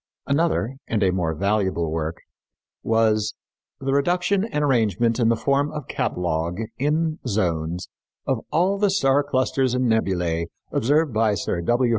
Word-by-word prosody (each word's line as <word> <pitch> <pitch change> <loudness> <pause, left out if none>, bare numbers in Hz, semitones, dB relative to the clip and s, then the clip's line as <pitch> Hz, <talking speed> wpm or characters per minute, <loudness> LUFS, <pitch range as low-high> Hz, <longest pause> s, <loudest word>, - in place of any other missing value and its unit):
Another, 140 -3 0
and 110 -3 0
a 95 - +3
more 85 -3 -1
valuable 95 -3 0
work, 80 +1 -3 0.6
was 110 -2 +1 0.4
_The 135 0 -1
Reduction 180 +7 +2
and 150 -10 -2
Arrangement 115 -3 +2
in 115 -2 +3
the 115 - +3
Form 140 +4 +1
of 150 -4 -6
Catalogue, 85 0 -2 0.2
in 155 +3 0
Zones, 85 -5 -1 0.4
of - - 0
All 190 +4 +2
the 205 -1 +3
Star 140 -7 +3
Clusters 130 -2 0
and 125 0 +1
Nebulæ 90 -7 0 0.2
Observed 145 +3 +2
by 110 -1 +2
Sir 85 -1 -2
W. 120 +7 +2
115 Hz, 145 wpm, -23 LUFS, 95-145 Hz, 0.6 s, a